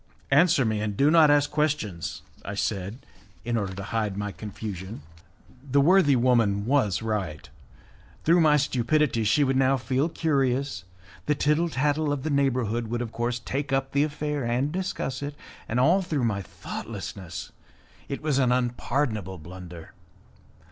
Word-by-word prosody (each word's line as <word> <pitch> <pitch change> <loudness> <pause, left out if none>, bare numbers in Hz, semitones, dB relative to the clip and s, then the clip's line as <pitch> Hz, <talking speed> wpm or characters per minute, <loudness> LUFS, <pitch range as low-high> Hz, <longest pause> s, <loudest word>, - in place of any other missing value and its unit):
"Answer 145 -2 +5
me, 110 -1 0
and 105 -2 -3
do 145 +2 +4
not 160 -2 +7
ask 145 0 +3
questions," 110 - -2 0.2
I 100 - -5
said, 100 +5 -3 0.4
in 120 0 -1
order 100 -4 -2
to 100 - -6
hide 105 -1 -2
my 105 0 -3
confusion. 100 -4 -7 0.6
The 140 0 +1
worthy 150 -1 +5
woman 115 -5 +2
was 115 -6 +1
right; 95 -10 -3 0.8
through 170 +2 +4
my 150 -2 +5
stupidity 130 -2 +1
she 110 +8 +3
would 135 -1 +1
now 135 0 +3
feel 130 +5 0
curious; 135 - 0 0.4
the 150 - +2
tittle 150 +4 +2
tattle 145 +1 0
of 140 -2 -2
the 155 - -2
neighbourhood 125 -5 +1
would 120 +2 -2
of 115 - -7
course 120 +1 -1
take 140 +3 -4
up 135 0 0
the 140 +1 +3
affair 150 -1 -2
and 125 +5 0
discuss 180 -7 -3
it; 145 +1 -5 0.3
and 115 - 0
all 170 +9 +4
through 155 -7 -2
my 105 -4 0
thoughtlessness! 95 0 -7 0.6
It 140 - -4
was 150 -3 +1
an 125 -2 +3
unpardonable 120 -5 -1
blunder. 90 0 -10
130 Hz, 155 wpm, -26 LUFS, 105-145 Hz, 0.8 s, not